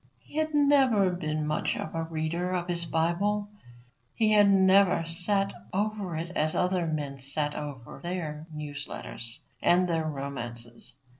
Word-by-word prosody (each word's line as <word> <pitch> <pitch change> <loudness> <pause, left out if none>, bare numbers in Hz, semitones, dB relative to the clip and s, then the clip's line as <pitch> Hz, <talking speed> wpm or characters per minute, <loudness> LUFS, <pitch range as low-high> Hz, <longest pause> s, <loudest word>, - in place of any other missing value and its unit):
He - - -16
had 310 -1 0
never 265 -9 +4
been 155 -3 -2
much 150 0 0
a 165 +1 -4
reader 165 +3 -2
of 175 -1 -1
his 170 -1 +1
Bible; 185 +6 0 0.7
he 220 -1 +3
had 205 -1 +6
never 190 -2 +5
sat 195 +4 +1 0.2
over 205 -3 -1
it 170 +2 -4
as 155 +1 +2
other 180 -2 +1
men 145 -3 -3
sat 145 +2 -1
over 145 -6 -7
their 160 -3 -4
news 145 -2 -6
letters 115 -1 -5 0.2
and 180 +1 +4
their 165 -2 0
romances. 120 -5 -5
170 Hz, 145 wpm, -28 LUFS, 150-195 Hz, 0.7 s, had